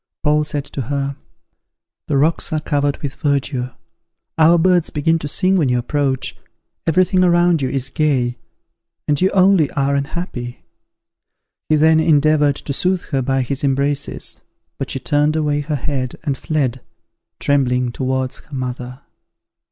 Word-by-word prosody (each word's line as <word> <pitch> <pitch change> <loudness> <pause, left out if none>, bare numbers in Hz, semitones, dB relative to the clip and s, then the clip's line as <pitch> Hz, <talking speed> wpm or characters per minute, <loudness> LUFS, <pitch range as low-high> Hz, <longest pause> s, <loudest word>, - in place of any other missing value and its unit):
Paul 150 0 +3
said 145 -1 -3
to 140 - -5
her, 140 -1 -2 0.9
"The 145 - +1
rocks 155 +4 +2
are 155 - 0
covered 145 -1 -1
with 140 -2 -3
verdure, 140 -4 -1 0.6
our 165 +2 +5
birds 180 0 +3
begin 165 +2 +1
to 145 - -4
sing 185 +6 +2
when 150 -7 +2
you 125 - +2
approach, 135 +1 -1 0.5
everything 185 +3 +3
around 175 -2 +3
you 130 - 0
is 135 0 -3
gay, 130 -6 0 0.7
and 145 -1 +1
you 190 - +4
only 185 -6 +4
are 140 0 +1
unhappy." 140 - -4 1.0
He 155 - +4
then 160 +1 +4
endeavoured 150 -2 +3
to 140 - -5
soothe 180 +5 0
her 135 -2 +1
by 135 +1 0
his 135 +3 -4
embraces, 140 +1 -1 0.4
but - - -3
she - - -2
turned 150 +1 +1
away 150 -2 +1
her 150 +1 -2
head, 130 -2 -3
and 145 -4 -1
fled, 135 -5 -2 0.6
trembling 125 -3 +1
towards 130 0 -2
her 145 - -11
mother. 125 0 -5
145 Hz, 150 wpm, -19 LUFS, 135-155 Hz, 1.0 s, our